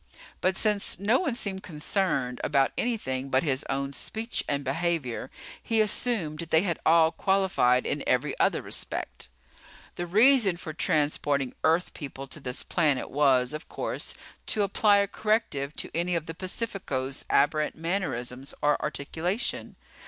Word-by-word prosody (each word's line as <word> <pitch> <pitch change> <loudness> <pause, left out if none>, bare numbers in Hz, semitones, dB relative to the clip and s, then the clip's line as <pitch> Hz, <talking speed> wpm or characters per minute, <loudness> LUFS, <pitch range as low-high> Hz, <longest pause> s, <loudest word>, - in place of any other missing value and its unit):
But 185 +1 +1
since 210 -2 0
no 205 +7 +3
one 280 -10 -1
seemed 195 -6 -3
concerned 150 -6 -1
about 140 -2 +2
anything 135 - -2
but 130 0 +2
his 140 -3 0
own 140 0 -2
speech 225 - -2
and 140 -1 0
behavior, 135 -4 -1 0.3
he 225 -1 +1
assumed 210 -7 0
that 170 -1 -5
they 160 +2 +4
had 170 -5 -1
all 160 0 +6
qualified 190 -10 +2
in - - -2
every - - +1
other - - +2
respect. - - -4 0.7
The 175 - -3
reason 215 -1 +5
for 160 -2 -7
transporting 145 -4 +1
Earth 165 +3 +2
People 135 -3 -7
to 135 +3 -9
this 125 -2 -4
planet 150 -7 0
was, 135 -2 +3
of 155 - -7
course, - - -4 0.3
to 210 - +2
apply 205 +1 +4
a 200 0 +2
corrective 195 -11 -1
to - - -3
any 175 +1 0
of 165 -2 -2
the 165 - -6
Pacificos' 175 - -3
aberrant 150 +2 +2
mannerisms 140 -7 -3
or 150 0 +3
articulation. 175 - -3
160 Hz, 150 wpm, -27 LUFS, 140-195 Hz, 0.7 s, all